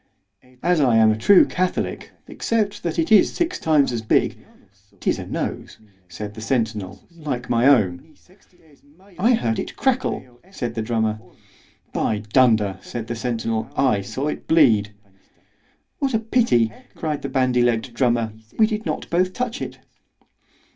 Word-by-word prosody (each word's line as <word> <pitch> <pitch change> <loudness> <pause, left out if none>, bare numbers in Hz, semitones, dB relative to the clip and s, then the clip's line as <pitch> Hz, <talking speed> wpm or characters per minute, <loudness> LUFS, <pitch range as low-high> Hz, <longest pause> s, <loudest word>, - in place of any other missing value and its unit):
As 175 -3 +3
I 125 -5 +3
am 110 -1 +6
a - - +1
true 185 - +6
catholic—except 200 +3 -2
that 170 -2 -3
it 165 +3 0
is 210 -3 +5
six 345 +1 -1
times 150 -4 +3
as 120 -2 -2
big—'tis 110 - -3
a - - -7
nose, - - -4 0.3
said 105 +4 -7
the 110 - -9
centinel, 110 -5 -2
like 140 -7 -4
my 120 +2 +3
own. 110 - +2 1.0
—I 230 +6 +4
heard 115 - -1
it - - -5
crackle, 240 - -1
said 120 - -4
the 115 - -3
drummer. 110 -1 -1 0.7
By 105 -1 -1
dunder, 110 -7 +3
said 120 -2 -6
the 120 - -4
centinel, 115 -1 -2
I 125 -7 +2
saw 130 +8 -4
it 150 - -5
bleed. 115 -11 +4 1.1
What 270 -4 0
a - - +2
pity, 220 - +2 0.2
cried 155 -3 -3
the - - -4
bandy 130 -2 +2
legg'd 120 0 0
drummer, 120 -3 +1 0.2
we 220 - +6
did 215 -3 -3
not 155 - -3
both 185 +2 +1
touch 250 +1 -3
it! - - -6
125 Hz, 145 wpm, -22 LUFS, 110-175 Hz, 1.1 s, am